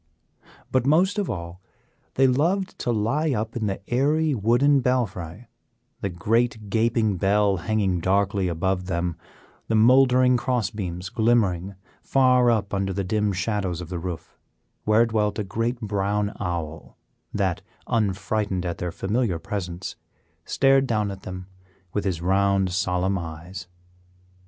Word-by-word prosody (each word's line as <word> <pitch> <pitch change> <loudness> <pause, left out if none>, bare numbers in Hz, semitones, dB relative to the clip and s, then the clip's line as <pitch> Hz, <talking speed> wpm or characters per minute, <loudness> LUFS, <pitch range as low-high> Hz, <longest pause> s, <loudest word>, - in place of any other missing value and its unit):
But 130 0 +1
most 185 +8 +3
of 200 - -2
all 85 +1 -6 0.5
they 135 - +4
loved 170 +9 +1
to - - -2
lie 130 +8 0
up 110 +1 -3
in 110 -3 -1
the 100 0 -5
airy 150 +5 +2
wooden 125 +6 +3
belfry; 115 -6 -2 0.5
the 100 - -2
great 110 +3 0
gaping 110 -2 +1
bell 100 +1 +2
hanging 95 -1 0
darkly 100 +1 +1
above 90 +2 -1
them, 85 -2 -1 0.5
the 115 - +1
mouldering 125 +2 +5
cross 125 -3 -1
beams 90 -4 -5
glimmering 100 -5 +1 0.3
far 125 -2 +4
up 105 -4 0
under 95 0 0
the 100 +1 -2
dim 105 +2 0
shadows 95 -1 -2
of 85 -2 -7
the 90 -2 -4
roof, 85 -1 -7 0.5
where 110 +2 +4
dwelt 105 -2 0
a 105 - -1
great 115 +5 -2
brown 105 -1 -1
owl 85 -4 -5 0.3
that, 100 -1 -1 0.2
unfrightened 105 -3 -1
at 85 -1 -3
their 90 -1 -3
familiar 100 +1 -1
presence, 90 -2 -5 0.5
stared 135 0 +3
down 105 -3 0
at 95 0 -8
them 90 0 -7 0.5
with 105 - -1
his 85 -4 -2
round, 95 0 +2
solemn 95 +1 0
eyes. 85 +3 -8
100 Hz, 140 wpm, -24 LUFS, 90-120 Hz, 0.5 s, mouldering